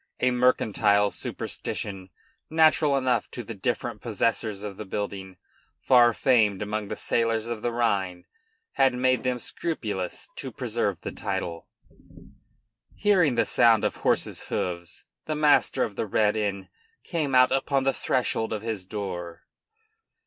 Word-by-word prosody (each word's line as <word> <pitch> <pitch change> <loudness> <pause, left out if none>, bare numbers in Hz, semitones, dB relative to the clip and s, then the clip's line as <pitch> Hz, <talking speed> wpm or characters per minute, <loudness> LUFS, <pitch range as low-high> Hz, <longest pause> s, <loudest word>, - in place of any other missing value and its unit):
A 125 - +2
mercantile 105 -5 +3
superstition, 95 -3 -5 0.4
natural 155 -2 +4
enough 130 -2 0
to 120 - -6
the 115 - -7
different 100 - -3
possessors 110 -3 -1
of 100 -2 -6
the - - -5
building, 95 -2 -5 0.4
far 120 -2 +5
famed 110 -6 +2
among 105 0 -3
the - - -4
sailors 115 -1 0
of 115 -2 -4
the 120 - -1
Rhine, 95 -7 -1 0.5
had 135 -2 +3
made 130 0 +2
them 125 -1 -1
scrupulous 110 - -4
to - - -5
preserve - - -2
the - - -5
title. 85 -1 -4 1.3
Hearing 180 - +3
the - - +2
sound 115 -3 +4
of - - -1
horses' - - 0
hoofs, 85 -1 -4 0.2
the 155 - -1
master 150 -3 +3
of 100 - -4
the 110 - -2
Red 105 +1 +2
Inn 100 -3 -2 0.3
came 150 -6 -1
out 125 0 +6
upon 135 0 +1
the 135 0 +2
threshold 120 -3 -1
of 105 -1 -4
his 110 -4 -3
door. 90 -4 -6
115 Hz, 140 wpm, -26 LUFS, 100-130 Hz, 1.3 s, out